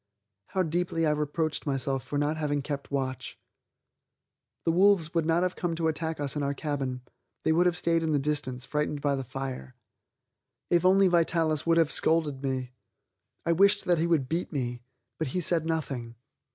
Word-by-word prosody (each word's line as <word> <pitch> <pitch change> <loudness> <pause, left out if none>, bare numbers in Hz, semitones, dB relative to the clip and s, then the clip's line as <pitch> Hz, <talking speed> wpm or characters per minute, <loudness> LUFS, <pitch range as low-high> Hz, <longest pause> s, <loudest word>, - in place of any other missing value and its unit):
How 190 - 0
deeply 165 0 0
I 155 - +3
reproached 150 +1 -2
myself 135 -1 0
for 145 - -4
not 145 +2 +1
having 145 -2 -1
kept 140 0 -5
watch. 130 -3 -3 1.3
The 165 - +3
wolves 180 -2 +3
would 165 -2 +1
not 165 +2 +3
have 185 0 -1
come 175 -2 -2
to 165 0 0
attack 160 0 -2
us 145 0 -1
in 150 - -1
our 140 0 -1
cabin; 135 -4 -3 0.4
they - - +2
would 175 +3 +4
have 175 0 0
stayed 165 -1 +1
in 160 -1 -1
the 150 - +3
distance, 135 -3 -2
frightened 150 -1 -2
by 140 -1 +1
the 135 - -3
fire. 130 - -6 1.0
If 175 -1 +4
only 190 +1 +6
Vitalis 165 -3 +2
would 165 0 +4
have 165 -2 +3
scolded 155 -4 +2
me! 130 -2 -2 0.7
I 170 - +2
wished 200 +4 +4
that 175 -2 +2
he 165 - +1
would 155 -6 +1
beat 170 +5 -2
me. 125 -5 -3 0.4
But 160 - -1
he - - +2
said 165 -2 +2
nothing. 135 -8 -3
155 Hz, 185 wpm, -28 LUFS, 140-170 Hz, 1.3 s, only